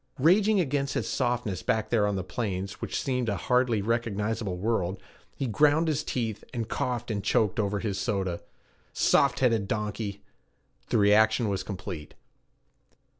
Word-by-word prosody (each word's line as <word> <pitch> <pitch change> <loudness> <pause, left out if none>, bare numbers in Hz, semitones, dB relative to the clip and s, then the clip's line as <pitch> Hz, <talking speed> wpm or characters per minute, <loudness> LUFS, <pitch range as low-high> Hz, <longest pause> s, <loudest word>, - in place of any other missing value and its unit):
Raging 195 +8 +4
against 140 -4 0
his - - -1
softness 120 -7 -1
back 110 -1 -1
there 110 -3 +3
on 100 - 0
the 95 - -2
plains, 100 -2 -4
which - - -2
seemed 125 -3 -1
a 100 - -1
hardly 125 -2 +1
recognizable 110 -3 -1
world, 95 -2 -1 0.4
he 135 - -2
ground 150 +7 +3
his 155 -1 0
teeth, 115 -7 -3
and 115 -3 -3
coughed 120 0 -2
and 100 -2 -2
choked 105 0 +1
over 105 -1 0
his 100 -2 -2
soda. 95 -4 -1 0.5
Soft 140 -2 +3
headed 115 -6 +2
donkey! 105 -1 -3 0.7
The - - +2
reaction 110 +2 +4
was 95 -2 -1
complete. 90 -6 -7
110 Hz, 150 wpm, -28 LUFS, 100-125 Hz, 0.7 s, Raging